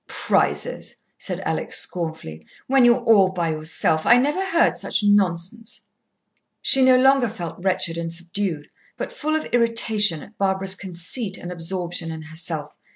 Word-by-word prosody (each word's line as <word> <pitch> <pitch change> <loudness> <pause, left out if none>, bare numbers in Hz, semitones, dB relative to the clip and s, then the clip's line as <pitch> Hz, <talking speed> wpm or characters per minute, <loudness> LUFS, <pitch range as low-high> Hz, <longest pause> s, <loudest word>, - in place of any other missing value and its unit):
"Prizes!" - - -1 0.2
said - - -4
Alex - - -1
scornfully. 160 - -4 0.2
"When 270 -1 +3
you're 240 0 +3
all 205 -5 +4
by 170 -3 -2
yourself! 155 0 0
I 240 - +5
never 295 +9 0
heard 340 -3 +2
such - - 0
nonsense." 205 +2 0 0.8
She 270 - +5
no 255 -1 +5
longer 265 -2 +3
felt 175 -4 -8
wretched 180 -3 -1
and 165 0 -4
subdued, 170 -2 -4 0.3
but - - -6
full 310 +1 -2
of 315 - -2
irritation 220 -7 +3
at 215 - -18
Barbara's 190 -1 +1
conceit 190 +3 -2
and 175 - -8
absorption 175 -1 -2
in 160 -1 -8
herself. 155 -1 -3
190 Hz, 150 wpm, -22 LUFS, 165-235 Hz, 0.8 s, I